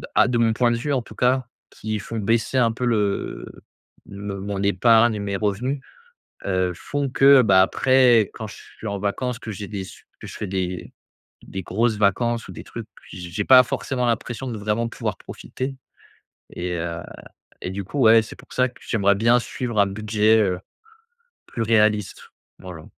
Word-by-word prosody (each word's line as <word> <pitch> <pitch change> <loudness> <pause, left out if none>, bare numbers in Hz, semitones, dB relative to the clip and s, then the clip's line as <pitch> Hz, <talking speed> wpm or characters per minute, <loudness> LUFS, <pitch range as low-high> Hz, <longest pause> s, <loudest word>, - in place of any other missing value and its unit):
à - - +5
de 125 -2 0
mon 115 -1 +3
point 120 +1 +2
de 120 - 0
vue 145 +5 -3
en 130 - +1
tout - - -14
cas 125 +1 +2 0.2
qui 110 0 -4
font 115 +3 -6
baisser 115 +4 0
un 120 -3 +3
peu 125 +2 -3
le 105 -4 -1 0.6
me 100 0 -6
mon 100 0 -4
épargne 110 +4 +4
et - - -4
mes 100 -1 -3
revenus, 110 +7 -1 0.7
heu, 95 -2 0
font 145 +10 -3
que, 135 0 +6
bah, 95 -5 +5
après 125 0 +4
quand 110 - -6
je 105 - -10 0.2
suis - - -8
en 100 -2 -3
vacances 115 +5 -2
que 115 - -8
j'ai 100 -1 -6
des 95 -1 -5
su - - -14 0.2
que - - -9
je - - -9
fais 105 - -4
des 90 -2 -4 0.5
des 95 - -6
grosses 110 +5 0
vacances 115 +4 +1
ou - - -8
des - - -9
trucs, 115 -2 -8 0.3
j 90 -2 -8
j'ai 105 +4 -2
pas 130 +2 +8
forcément 125 +1 -2
l'impression 120 +2 -2
de 115 - -4
vraiment 105 +3 -1
pouvoir - - -4
profiter 135 +1 -6 0.8
et 90 0 -4
heu 85 0 -4 0.6
et 90 - -4
du 100 +1 -4
coup 140 +10 -5
ouais 115 -2 +7
c'est 110 - -10
pour - - -15
ça 125 0 +2
que 125 - -20
j'aimerais 100 -3 +2
bien 115 +4 +4
suivre 120 -1 -3
un 100 - +5
budget, 110 +2 +2
heu, 90 -3 0 0.9
plus 115 - -5
réaliste, 105 -3 +1 0.3
voilà. 85 -4 -10
110 Hz, 190 wpm, -23 LUFS, 100-120 Hz, 0.9 s, pas